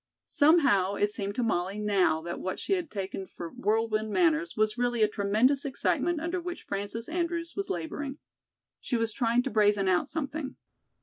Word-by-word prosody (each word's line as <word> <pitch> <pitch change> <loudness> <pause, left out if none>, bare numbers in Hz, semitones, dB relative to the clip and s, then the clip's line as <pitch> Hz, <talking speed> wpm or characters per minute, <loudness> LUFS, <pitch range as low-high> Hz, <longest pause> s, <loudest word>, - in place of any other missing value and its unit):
Somehow, 275 - +4
it 205 +1 +1
seemed 200 -1 -3
to 250 - 0
Molly 195 -3 -1
now 190 -7 +2
that 170 0 -5
what 185 - -3
she - - -1
had 355 -5 -1
taken 195 -1 -5
for 170 -1 -8
whirlwind 215 +1 0
manners 330 - +1
was 215 0 +2
really 240 -2 +1
a - - +5
tremendous 215 +7 +2
excitement 315 +4 0
under 345 +3 -2
which 355 0 -6
Frances 205 +3 -4
Andrews 335 0 -2
was 395 0 -3
laboring. 270 - -4 0.6
She 245 - -1
was 225 -1 0
trying 240 0 +2
to - - -3
brazen 205 -2 +3
out 185 +9 +2
something. 295 -2 -4
225 Hz, 175 wpm, -28 LUFS, 200-305 Hz, 0.6 s, a